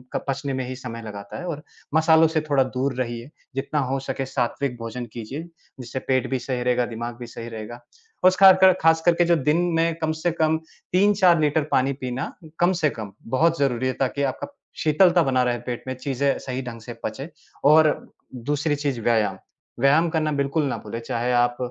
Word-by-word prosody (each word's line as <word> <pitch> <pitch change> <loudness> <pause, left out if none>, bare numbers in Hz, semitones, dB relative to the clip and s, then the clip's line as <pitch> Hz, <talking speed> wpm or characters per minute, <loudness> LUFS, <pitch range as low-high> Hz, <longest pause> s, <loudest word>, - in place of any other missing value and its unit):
क - - +1
पचने 135 0 -2
में 130 -1 -2
ही 130 - -5
समय 120 -3 -7
लगाता 100 -1 -8
है 180 - -6
और 150 -3 -5 0.3
मसालों 160 0 +5
से 160 0 0
थोड़ा 140 -2 +4
दूर 130 +1 -2
रहिए। 120 0 -4 0.3
जितना 140 +2 -1
हो 135 0 -1
सके 135 0 -4
सात्विक 130 0 -2
भोजन 115 +1 -5
कीजिए, 120 +6 -6 0.4
जिससे 125 +1 -5
पेट 130 -1 0
भी 130 - -1
सही 125 0 -3
रहेगा, 125 0 +2
दिमाग 120 +1 -5
भी 120 - -7
सही 115 0 -8
रहेगा 110 +1 -8 0.4
और 185 - +7
खाकर 190 -1 +8
ख़ासकर 165 +1 +4
के 175 +1 +2
जो 170 0 +4
दिन 150 +1 +1 0.2
में 165 0 +2
कम 160 0 +1
से 160 +2 -1
कम 160 -1 +1 0.3
3-4 185 -2 +4
लीटर 150 0 +2
पानी 135 +2 +2
पीना 130 +1 -4 0.3
कम 175 +1 +4
से 160 -4 +1
कम 110 -6 -7 0.2
बहुत 165 +6 +2
ज़रूरी 130 -2 +1
है, 130 - 0
ताकि 135 +2 -1
आपका 130 -2 -2 0.3
शीतलता 175 +3 +4
बना 130 -2 +2
रहे 120 -1 0
पेट 120 0 -5
में, 130 - -2
चीज़ें 135 +1 -1
सही 130 0 -4
ढंग 115 -2 -8
से 120 +2 -8
पचे। 135 +4 -5 0.3
और 155 +1 +6 0.4
दूसरी 145 +4 -1
चीज़ 140 -4 -2
व्यायाम, 110 -4 +1 0.4
व्यायाम 150 +6 +4
करना 155 -1 0
बिल्कुल 140 +2 0
ना 135 - -2
भूलें, 110 +2 -5
चाहे 120 +1 -2
आप 120 0 +2
135 Hz, 195 wpm, -23 LUFS, 120-155 Hz, 0.4 s, खाकर